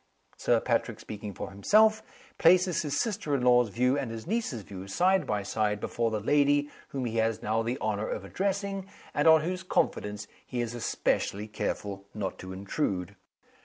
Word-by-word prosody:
Sir - - +2
Patrick, - - -1
speaking 105 -2 -7
for - - -6
himself, 215 - +4 0.4
places 180 +1 +5
his 145 -2 -1
sister 185 -10 -1
in 130 - -1
law's 125 -2 +5
view 125 +6 +2
and 135 -4 -3
his 115 -1 -6
niece's 185 - -2
view, 95 -1 -9
side 185 - +2
by 105 -1 -1
side, 105 0 0
before 115 +2 -1
the 110 -1 -1
lady 145 +4 +3 0.2
whom 135 -2 -3
he 115 -1 -2
has 115 0 +1
now 110 +2 +1
the 120 +3 -2
honor 110 0 -1
of 100 - -4
addressing, 195 - -2 0.3
and 145 +2 +2
on 160 -1 +8
whose 180 +3 -2
confidence 105 - -1 0.2
he 125 - -5
is 120 -1 -2
especially 105 -3 -1
careful 100 -2 -4
not 100 -3 -3
to 95 - -8
intrude. 95 - -2
120 Hz, 175 wpm, -29 LUFS, 105-160 Hz, 0.4 s, on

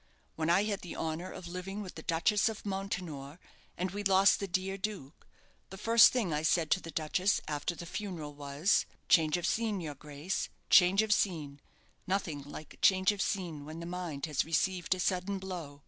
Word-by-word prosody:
When 160 0 -1
I 180 +4 +4
had 205 -2 -2
the 175 - -7
honour 160 +3 -3
of 175 - -8
living 190 +4 -5
with 185 - -8
the - - -8
Duchess 175 +7 +2
of 220 - -8
Mountaintour, 180 -7 -4 0.4
and 185 0 -2
we 205 +2 -4
lost 195 0 +5
the 200 - -3
dear 190 +1 -1
duke, 195 -8 -6 0.4
the 190 - -9
first 225 +2 +7
thing 220 -10 0
I 150 - 0
said 160 0 +1
to 185 - +3
the 165 - -9
duchess, 165 +5 +1
after 150 +3 -2
the 170 - -8
funeral, 170 -5 -5
was 145 +6 +1 0.2
'Change 160 -1 +5
of 175 - -3
scene, 220 -3 0
your 155 -4 -5
grace, 150 +5 -4 0.2
change 190 +3 +7
of 215 -1 +3
scene; 150 -9 -1 0.5
nothing 185 -6 -1
like 145 +2 -10
change 190 0 +5
of 205 -1 -4
scene 170 -8 -2
when 155 +3 -8
the 170 - -6
mind 175 -5 -4
has 150 -4 0
received 180 +3 0
a - - -8
sudden 185 +2 0
blow.' 175 -7 -7
180 Hz, 195 wpm, -31 LUFS, 155-195 Hz, 0.5 s, first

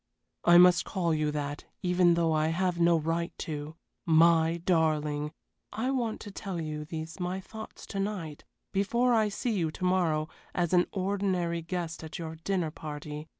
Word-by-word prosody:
"I 175 0 +8
must 180 0 +7
call 175 -5 -1
you 155 -1 +1
that 145 -1 -4 0.2
even 180 -1 +4
though 165 -1 +2
I 155 0 +2
have 175 +1 0
no 170 0 +5
right 165 +2 -1
to. 150 -1 -5 0.3
My 165 0 +4
darling 150 -3 +1 0.4
I 225 +6 -1
want 235 -5 -1
to 205 - -8
tell 190 -2 -5
you 155 -1 -4
these 160 +2 -6
my 180 +1 -2
thoughts 220 +3 -10
to 195 - -5
night, 190 -7 -4 0.3
before 235 +5 +2
I 220 -2 +3
see 235 +4 -2
you 175 -7 0
to 155 - -8
morrow 165 -4 +2 0.3
as 175 -1 0
an 175 0 +4
ordinary 185 -3 -1
guest 165 -1 -4
at 160 - -6
your 160 -1 -6
dinner 175 -1 -1
party. 150 0 -7
170 Hz, 170 wpm, -29 LUFS, 155-190 Hz, 0.4 s, I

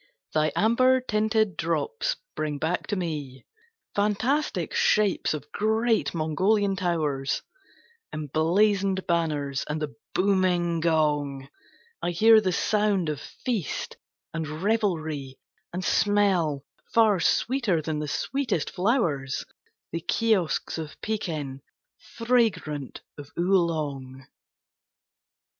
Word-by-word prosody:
Thy 155 0 +2
amber 255 +4 +4
tinted 220 -4 +1
drops 445 - -1 0.2
bring 150 -1 -2
back 160 +5 -2
to 205 - -1
me 150 -8 -4 0.5
Fantastic 225 - 0
shapes 340 - +2
of 145 0 -9
great 220 0 +1
Mongolian 195 +6 +1
towers, 155 -7 -1 0.7
Emblazoned 190 +6 +1
banners, 150 -6 0
and 150 +1 -1
the 150 -2 -4 0.2
booming 180 -3 +2
gong; 145 -4 0 0.5
I - - 0
hear 220 +6 +6
the 190 -3 0
sound 205 -2 +1
of 150 -1 -3
feast 230 - -4 0.4
and 160 0 -4
revelry, 160 - -1 0.3
And 180 +1 -4
smell, 185 -9 +2 0.3
far 220 -4 +4
sweeter 230 -2 +1
than 155 0 -3
the 150 - -3
sweetest 235 - -1
flowers, 175 - 0 0.5
The 165 - -3
kiosks 190 -4 0
of 155 -2 -7
Pekin, 155 -11 -3 0.6
fragrant 225 - 0 0.2
of 145 -1 -9
Oolong! 155 -8 0
175 Hz, 100 wpm, -26 LUFS, 150-215 Hz, 0.7 s, hear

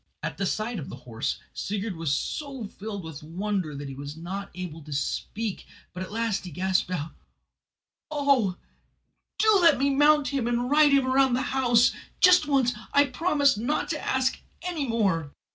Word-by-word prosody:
At - - -4
the 195 - +1
sight 215 +2 -2
of 145 - -7
the - - -7
horse 120 +3 -4 0.2
Sigurd 205 0 -3
was 165 -3 -2
so 270 - -3
filled 200 -1 -7
with 160 -3 -8
wonder 180 0 -3
that 140 0 -6
he 135 - -6
was 140 +3 -7
not 190 +4 -5
able 175 -3 -6
to 150 - -10
speak, 195 +9 -3 0.3
but 180 - -6
at 185 - -6
last 225 -2 -1
he 180 - -7
gasped 185 +3 0
out: 165 -3 -3 1.0
"Oh, 280 -10 +2 0.8
do 435 -2 +5
let 330 -3 +6
me 275 +2 +2
mount 295 +1 +4
him 270 -4 -1
and 240 +2 0
ride 300 0 +6
him 275 -1 +4
round 260 -1 +3
the 260 - 0
house! 245 -3 +4 0.3
Just 360 -4 +6
once; 265 -4 +2 0.2
I 285 0 +6
promise 285 - +2
not 245 +8 -1
to 305 - -2
ask 260 0 0 0.2
any 330 -6 -2
more." 190 -10 0
225 Hz, 180 wpm, -26 LUFS, 180-275 Hz, 1.0 s, let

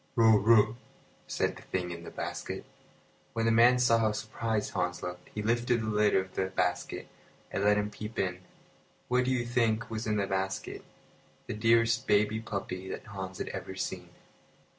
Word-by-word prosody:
"Row, 115 -2 +6
row!" 110 +1 +4 0.5
said - - 0
the - - -11
thing 90 -1 -3
in 85 -1 -7
the - - -7
basket. - - -5 0.7
When 115 0 0
the 115 - +4
man 120 +2 +6
saw 120 -2 +4
how 110 -1 +2
surprised 110 0 -2
Hans 90 -1 -2
looked, 90 0 -6
he 105 - -5
lifted 120 +2 +2
the - - -3
lid 105 -1 +2
of 95 0 0
the 95 - 0
basket 95 - -2 0.4
and 95 - -1
let 105 0 +5
him 105 0 -1
peep 110 +2 -7
in. 90 -2 -1 0.7
What 125 0 +3
do 130 - +1
you 120 -2 0
think 120 -1 +1
was 110 0 -3
in 105 - +1
the 100 - +1
basket? 95 0 -3 0.6
The - - -4
dearest 115 +2 +3
baby 105 +1 +3
puppy 95 -4 -5
that - - -6
Hans 95 -1 -5
had - - -4
ever 95 - -6
seen. 90 -1 -4
105 Hz, 185 wpm, -30 LUFS, 95-115 Hz, 0.7 s, Row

